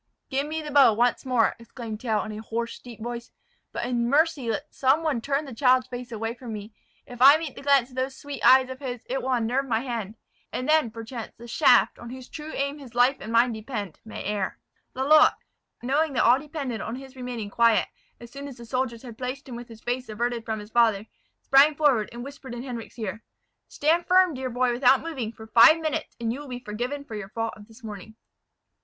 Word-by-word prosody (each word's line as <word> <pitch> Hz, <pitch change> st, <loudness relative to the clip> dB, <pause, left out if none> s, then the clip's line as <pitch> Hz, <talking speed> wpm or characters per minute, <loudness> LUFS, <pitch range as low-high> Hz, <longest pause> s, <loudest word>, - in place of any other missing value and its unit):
"Give 275 Hz, +2 st, 0 dB
me 315 Hz, +1 st, -3 dB
the 300 Hz, -, -6 dB
bow 275 Hz, -5 st, +7 dB
once 240 Hz, +4 st, +1 dB
more!" 245 Hz, -3 st, +2 dB
exclaimed 230 Hz, -2 st, -8 dB
Tell, 220 Hz, -4 st, 0 dB
in 215 Hz, -, -6 dB
a 215 Hz, 0 st, -6 dB
hoarse, 230 Hz, +1 st, -4 dB
deep 235 Hz, -3 st, -11 dB
voice; 240 Hz, 0 st, -5 dB, 0.4 s
"but -, -, -3 dB
in 240 Hz, -1 st, 0 dB
mercy 290 Hz, -3 st, +2 dB
let 285 Hz, +7 st, -3 dB
some 275 Hz, +5 st, +2 dB
one 295 Hz, -7 st, 0 dB
turn 280 Hz, +4 st, -1 dB
the 270 Hz, -, -8 dB
child's 255 Hz, +1 st, +3 dB
face 245 Hz, -1 st, -8 dB
away 225 Hz, 0 st, -3 dB
from 240 Hz, -2 st, -8 dB
me. 210 Hz, +1 st, -8 dB, 0.3 s
If 245 Hz, 0 st, -11 dB
I 280 Hz, +3 st, +9 dB
meet 315 Hz, -4 st, -5 dB
the -, -, -9 dB
glance 275 Hz, -3 st, +3 dB
of -, -, -14 dB
those 260 Hz, +1 st, -2 dB
sweet 285 Hz, -1 st, -8 dB
eyes 260 Hz, 0 st, +7 dB
of 260 Hz, -, -8 dB
his, 250 Hz, -4 st, -6 dB
it 265 Hz, +2 st, -2 dB
will 265 Hz, -, -2 dB
unnerve 250 Hz, +3 st, 0 dB
my 225 Hz, -2 st, +1 dB
hand; 230 Hz, -5 st, -4 dB, 0.4 s
and 255 Hz, -, -3 dB
then, 310 Hz, -5 st, +4 dB
perchance, 230 Hz, +1 st, -8 dB
the 235 Hz, -, -11 dB
shaft, 230 Hz, -, +4 dB
on 240 Hz, -, -9 dB
whose 255 Hz, 0 st, -9 dB
true 305 Hz, 0 st, -7 dB
aim 280 Hz, +1 st, -2 dB
his 250 Hz, -4 st, -12 dB
life 250 Hz, +3 st, +4 dB
and 220 Hz, -, -7 dB
mine 235 Hz, +2 st, +4 dB
depend, 215 Hz, -, -6 dB
may 220 Hz, -, -7 dB
err." 205 Hz, -2 st, -2 dB, 0.4 s
Lalotte, 295 Hz, +4 st, +5 dB, 0.5 s
knowing 285 Hz, +4 st, +1 dB
that -, -, +2 dB
all 245 Hz, +3 st, +5 dB
depended 280 Hz, -6 st, -5 dB
on 225 Hz, -, -4 dB
his 265 Hz, 0 st, -11 dB
remaining 245 Hz, -5 st, -5 dB
quiet, 230 Hz, 0 st, +4 dB, 0.3 s
as 235 Hz, 0 st, -12 dB
soon 280 Hz, +1 st, -7 dB
as 270 Hz, -3 st, -10 dB
the 235 Hz, -, -10 dB
soldiers 245 Hz, -1 st, -2 dB
had 235 Hz, -3 st, -10 dB
placed 260 Hz, +3 st, -5 dB
him 250 Hz, -, -7 dB
with 240 Hz, 0 st, -8 dB
his 225 Hz, -2 st, -13 dB
face 250 Hz, 0 st, -3 dB
averted 235 Hz, +2 st, -2 dB
from 220 Hz, 0 st, -3 dB
his 210 Hz, +1 st, -11 dB
father, 220 Hz, -3 st, +3 dB, 0.4 s
sprang 280 Hz, +3 st, +6 dB
forward, 275 Hz, -8 st, +2 dB
and 240 Hz, +1 st, -7 dB
whispered 270 Hz, -2 st, -9 dB
in 240 Hz, -, -6 dB
Henric's 245 Hz, -3 st, -7 dB
ear, 220 Hz, -1 st, -4 dB, 0.5 s
"Stand 330 Hz, +4 st, +1 dB
firm, 365 Hz, -2 st, +5 dB
dear 260 Hz, -1 st, -4 dB
boy, 245 Hz, +1 st, +1 dB
without 255 Hz, +2 st, +4 dB
moving, 270 Hz, -10 st, -4 dB
for 220 Hz, -1 st, -12 dB
five 235 Hz, +8 st, +7 dB
minutes, 315 Hz, -2 st, -3 dB
and 230 Hz, -1 st, -1 dB
you 265 Hz, -, -6 dB
will 290 Hz, -, -9 dB
be 250 Hz, -2 st, -5 dB
forgiven 245 Hz, +5 st, -4 dB
for 230 Hz, -, -10 dB
your 210 Hz, -2 st, -6 dB
fault 225 Hz, +1 st, -3 dB
of 205 Hz, -1 st, -14 dB
this 230 Hz, +2 st, -18 dB
morning." 215 Hz, 0 st, -9 dB
245 Hz, 225 wpm, -26 LUFS, 230-275 Hz, 0.5 s, I